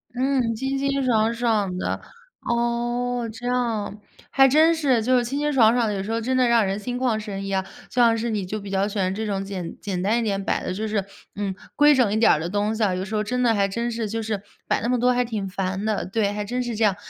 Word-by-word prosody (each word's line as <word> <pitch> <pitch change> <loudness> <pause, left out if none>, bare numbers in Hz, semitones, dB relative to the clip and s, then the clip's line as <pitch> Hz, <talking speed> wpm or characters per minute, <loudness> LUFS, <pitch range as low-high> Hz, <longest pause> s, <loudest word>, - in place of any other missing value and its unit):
嗯， 255 -3 +1
清 270 +3 -2
清 275 0 0
爽 225 -2 +2
爽 215 -6 0
的。 - - -2 0.4
哦， 240 0 -1
这 235 +2 -9
样， 230 -4 -1 0.3
还 270 -1 +5
真 315 +5 +5
是 265 -8 +1
就 255 +1 +3
是 240 - +1
清 275 +4 -3
清 295 0 0
爽 230 -4 +5
爽 225 -4 +1
有 195 - -2
时 220 +3 -3
候 230 - -1
真 255 +3 0
的 250 -1 +4
让 230 -3 +4
人 195 +2 -2
心 245 +4 -4
旷 245 -4 0
神 195 -2 -5
怡 195 - -4
啊。 190 0 0 0.2
像 235 -2 +3
是 235 +1 -2
你 205 -4 -2
就 215 +4 -4
比 200 - -8
较 195 +1 +1
喜 210 - -5
欢 185 0 +1
这 220 +2 -3
种 195 -2 -2
简 185 -4 -6
简 190 -3 -3
单 215 +5 +2
一 - - +1
点 200 -3 -1
摆 - - 0
的 185 - -3
就 215 +3 -3
是 210 -2 0 0.3
嗯， 200 -2 -2 0.2
规 295 0 +6
整 240 -6 +3
一 - - +1
点 225 - +5
儿 150 - +3
的 165 - -3
东 205 +2 0
西 220 - -4
啊， 185 -3 +2
有 185 - -3
时 215 +3 -5
候 210 - +1
真 250 +4 -1
的 230 - +4
还 200 -2 +2
真 235 +4 -2
是 225 -1 -2
就 225 +1 -3
是 210 -3 -3 0.2
摆 - - +1
那 230 - -1
么 250 0 +2
多 250 +1 +3
还 250 0 +1
挺 215 -4 -3
烦 190 +1 -3
的。 215 -1 -1
对， 205 +1 0
还 205 0 -3
真 250 +3 -2
是 240 -1 -3
这 220 0 +2
样。 195 -3 +2
225 Hz, 290 characters per minute, -23 LUFS, 200-245 Hz, 0.4 s, 规